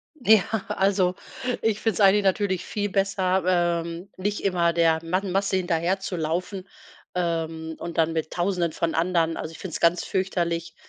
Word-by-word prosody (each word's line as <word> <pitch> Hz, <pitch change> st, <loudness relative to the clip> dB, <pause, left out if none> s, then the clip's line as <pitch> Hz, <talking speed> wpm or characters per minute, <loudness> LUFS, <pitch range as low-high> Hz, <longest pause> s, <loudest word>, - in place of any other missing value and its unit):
Ja, 220 Hz, -7 st, +5 dB, 0.3 s
also, 190 Hz, -2 st, +1 dB, 0.5 s
ich 215 Hz, -1 st, +1 dB
find's 225 Hz, -1 st, -1 dB
eigentlich 200 Hz, +1 st, +5 dB
natürlich 190 Hz, -1 st, +1 dB
viel 205 Hz, -1 st, -2 dB
besser, 190 Hz, -1 st, +1 dB, 0.4 s
ähm, 170 Hz, +3 st, -7 dB
nicht 205 Hz, +2 st, -2 dB
immer 175 Hz, -3 st, +2 dB
der 165 Hz, -1 st, +3 dB
man 185 Hz, +3 st, -1 dB
Masse 195 Hz, +1 st, +1 dB
hinterherzulaufen, 180 Hz, +1 st, -2 dB, 0.5 s
ähm, 165 Hz, -2 st, -2 dB
und 170 Hz, -1 st, -6 dB
dann 165 Hz, 0 st, +2 dB
mit 160 Hz, -1 st, -2 dB
Tausenden 175 Hz, -2 st, 0 dB
von 170 Hz, -1 st, -1 dB
anderen. 165 Hz, -1 st, +1 dB
Also, 155 Hz, -, -5 dB
ich 165 Hz, -, -12 dB
find's 185 Hz, -4 st, -5 dB
ganz 170 Hz, +1 st, +3 dB
fürchterlich, 170 Hz, -3 st, -2 dB
180 Hz, 150 wpm, -25 LUFS, 165-195 Hz, 0.5 s, Ja